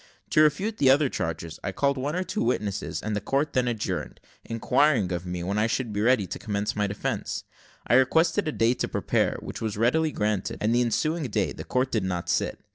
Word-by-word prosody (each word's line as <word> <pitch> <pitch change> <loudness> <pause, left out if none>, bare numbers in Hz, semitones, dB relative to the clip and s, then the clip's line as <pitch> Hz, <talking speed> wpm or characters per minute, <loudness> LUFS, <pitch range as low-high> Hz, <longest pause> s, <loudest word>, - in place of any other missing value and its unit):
To 155 - +5
refute 195 +9 +2
the 135 - +5
other 140 +1 +5
charges 80 -7 -4
I - - -2
called 140 +8 +1
one 140 +4 -2
or 185 - 0
two 185 +4 -3
witnesses, 105 -5 -1
and 105 0 -2
the 105 - -1
court 140 +7 0
then 125 -2 +2
adjourned, 115 -3 -3 0.2
inquiring 120 -2 +2
of 90 0 -3
me 90 -1 -3
when 100 +4 -1
I 110 +2 +2
would 120 -5 -4
be 105 - -1
ready 120 -2 +3
to - - -6
commence 105 0 -2
my 105 0 +1
defence. 100 +1 -3 0.4
I - - +1
requested 160 +7 +3
a - - +1
day 115 -3 +2
to - - -2
prepare, - - 0
which - - -7
was 110 -3 -2
readily 155 +8 +2
granted; 105 -5 -1
and 110 +2 +1
the 120 - +3
ensuing 155 +6 0
day - - 0
the - - -7
court 130 +1 0
did 110 -4 0
not 90 -2 -3
sit. - - 0
120 Hz, 220 wpm, -26 LUFS, 105-140 Hz, 0.4 s, To